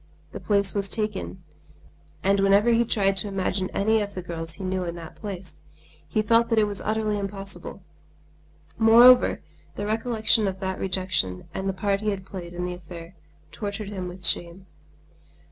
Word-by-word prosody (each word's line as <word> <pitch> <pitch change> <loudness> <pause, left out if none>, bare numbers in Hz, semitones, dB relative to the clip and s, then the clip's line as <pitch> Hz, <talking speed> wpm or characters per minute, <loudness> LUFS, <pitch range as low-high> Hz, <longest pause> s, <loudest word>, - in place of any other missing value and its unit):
The - - -7
place 200 -3 +1
was 200 -1 -1
taken, 210 -4 -1 0.8
and 195 +1 +3
whenever 200 +4 +4
he 235 0 +4
tried 195 -3 +1
to 200 - -1
imagine 190 -1 -2
any 220 +2 +1
of 200 -1 -5
the 185 - -5
girls 165 -2 -3
he 200 - -9
knew 185 0 -1
in 170 -1 -4
that 165 -2 -10
place, 195 -4 -8 0.5
he 215 - 0
felt 230 +2 +3
that 230 - +1
it 215 - +5
was 205 -1 -3
utterly 215 -1 -1
impossible. 195 -2 -6 1.0
Moreover, 235 +3 +6 0.3
the 205 - -4
recollection 220 0 +2
of 190 -1 -4
the 190 -1 -2
rejection 185 - -2
and 190 0 -2
the - - -1
part 195 +1 -1
he 215 - 0
had 195 -2 -4
played 180 -3 -8
in 175 0 -3
the 180 - -3
affair 170 0 -10 0.4
tortured 205 -1 -5
him 185 -3 -5
with 180 0 -8
shame. 175 +3 +1
195 Hz, 175 wpm, -25 LUFS, 185-210 Hz, 1.0 s, Moreover